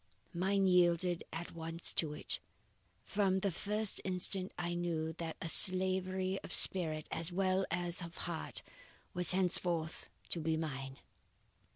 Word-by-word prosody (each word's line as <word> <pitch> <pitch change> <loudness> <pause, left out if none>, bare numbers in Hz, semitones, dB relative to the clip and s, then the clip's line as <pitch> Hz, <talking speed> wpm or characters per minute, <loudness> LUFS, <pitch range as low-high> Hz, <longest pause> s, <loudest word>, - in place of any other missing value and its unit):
Mine 195 +3 -1
yielded 175 -1 +1
at 165 +2 -8
once 165 0 +2
to 155 -3 -2
it. 150 - -4 0.7
From 195 -2 -1
the 200 - -2
first 210 +4 -1
instant, 185 0 +3
I 175 0 -4
knew 165 -2 -4
that 165 -1 -7
a 170 - -7
slavery 185 +1 +5
of - - -11
spirit, 155 -5 0
as 165 +2 0
well 190 +1 -1
as 175 +1 -3
of 170 -1 -10
heart, 170 -2 -6 0.5
was 180 -1 +1
henceforth 175 -3 -1 0.2
to 170 - -5
be 160 0 -2
mine. 135 -4 -7
175 Hz, 140 wpm, -33 LUFS, 165-185 Hz, 0.7 s, slavery